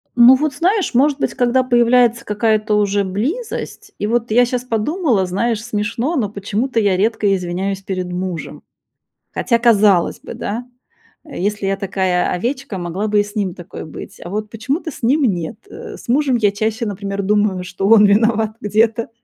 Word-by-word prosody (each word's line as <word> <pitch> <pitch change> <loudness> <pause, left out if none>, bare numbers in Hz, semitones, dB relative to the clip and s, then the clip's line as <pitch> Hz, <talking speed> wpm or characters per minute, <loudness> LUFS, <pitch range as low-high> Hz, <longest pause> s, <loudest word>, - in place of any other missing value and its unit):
Ну 240 +2 +8
вот, 295 +2 -1
знаешь, 365 - 0
может 280 +3 +3
быть, - - -1
когда 255 0 +2
появляется 240 -1 +3
какая-то 215 0 +1
уже 205 -1 +1
близость. 335 - -4
И - - -2
вот 235 +2 0
я 245 +2 +5
щас 245 0 -3
подумала, 245 - 0
знаешь, 215 +4 -1
смешно, 230 +6 -2
но 225 -9 0
почему-то 215 +5 -2
я 200 -3 +2
редко 205 +1 +1
извиняюсь 190 +2 -3
перед 185 -2 -4
мужем. 180 -2 -5 0.7
Хотя, 235 -2 +1
казалось 210 -6 +3
бы, - - -9
да, 235 +4 -5 0.6
э, 300 - -8
если 205 +1 -1
я 195 0 0
такая 190 -2 0
овечка, 240 +3 -3
могла 180 +4 -3
бы 210 -1 +3
и - - -1
с 205 0 -11
ним 195 -4 -2
такой 175 - -9
быть. 155 - -10
А 175 - -8
вот 210 +2 -4
почему-то 270 - -3
с 250 - -13
ним 280 +6 +3
нет. 180 -4 -1
Э, - - -9
с - - -15
мужем 270 +1 +2
я 210 -3 +2
чаще, 220 +3 -2
например, 200 -1 -4
думаю, 205 -2 +1
что 185 +2 -3
он 220 -1 +7
виноват 220 +1 +3
где-то, 220 +2 +1
215 Hz, 180 wpm, -18 LUFS, 195-245 Hz, 0.7 s, Ну